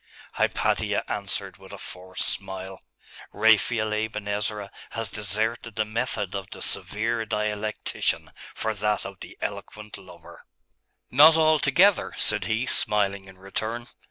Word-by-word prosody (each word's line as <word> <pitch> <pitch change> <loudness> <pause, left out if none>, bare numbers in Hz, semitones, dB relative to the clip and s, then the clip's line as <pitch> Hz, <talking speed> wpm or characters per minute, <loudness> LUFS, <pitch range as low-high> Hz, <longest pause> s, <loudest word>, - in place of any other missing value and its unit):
Hypatia - - +1
answered - - -3
with - - -14
a - - -7
forced 95 0 -5
smile. 95 -1 -5 0.5
'Raphael 110 +1 +3
Aben 105 -1 -2
Ezra 105 0 -2 0.3
has 115 -3 -1
deserted 110 +3 -1
the 110 - +1
method 110 -3 -2
of 95 -1 -4
the - - -9
severe 115 +2 0
dialectician 105 0 -1 0.2
for 110 - -1
that 105 -1 0
of 100 -2 -8
the - - -10
eloquent 105 +1 -5
lover.' 90 -2 -14 0.7
'Not 155 +5 +9
altogether,' 155 +4 +4
said 105 -3 +1
he, 110 +5 0
smiling 100 -5 +1
in 95 -1 -14
return. 110 +5 -4
105 Hz, 130 wpm, -26 LUFS, 100-115 Hz, 0.7 s, Not